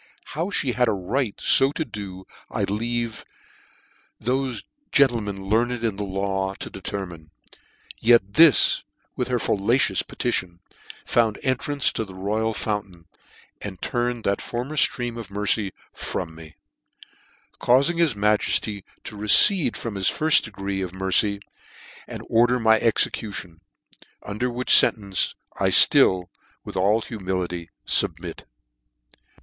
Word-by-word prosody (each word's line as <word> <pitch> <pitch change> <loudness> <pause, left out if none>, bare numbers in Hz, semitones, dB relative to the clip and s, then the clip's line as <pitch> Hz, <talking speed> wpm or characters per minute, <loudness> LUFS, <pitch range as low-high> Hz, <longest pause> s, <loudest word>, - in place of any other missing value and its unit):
How 165 +6 -2
me 130 - -1
had 125 0 +1
a 110 - +1
right 105 +5 -3
fo 135 +1 +4
to 160 - -3
do, 95 -5 -9 0.2
I - - -3
leave 115 +2 -3 1.0
thofe 130 -1 -2 0.3
gentlemen 110 -8 +1
learned 120 +3 0
in 110 -4 -1
the 105 - -3
law 95 0 -3
to - - -8
determine: 90 -5 -7 0.7
yet 115 -4 +3
this, 160 -2 +5 0.3
with 125 - -2
her 125 -1 0
fallacious 105 -1 +1
petition, 90 -8 -3 0.5
found 115 -3 +1
entrance 140 +2 0
to - - -2
the 95 -3 -12
Royal 105 +4 -2
Fountain, 100 -6 -5 0.6
and 95 -3 -7
turn 120 0 -2
ed 115 - -14
that 100 - -1
former 125 +6 -5
ftream 120 -5 +1
of 115 - -9
mercy 105 0 -1 0.2
from 80 -3 -5
mej 80 -1 -13 1.0
caufing 140 +8 +2
his 160 -9 +2
majefty 105 0 0 0.2
to - - -8
recede 115 - +6
from 115 - -5
his.firil 150 +11 +3
decree 100 -2 -5
of 95 -1 -6
mer~ 95 0 -4
cy, 100 +1 +2 0.7
and - - -8
order 120 +2 +2
my 110 -1 +4
execution: 100 -6 -1 0.6
under 105 +5 -3
which 125 +1 +3
fen - - +5
tence 100 -3 -1 0.2
I - - +2
ftill, 90 -1 +5 0.4
with - - -8
all 100 +4 +2
humility, 90 -5 -4 0.2
fubmit. - - 0
105 Hz, 135 wpm, -23 LUFS, 95-120 Hz, 1.0 s, recede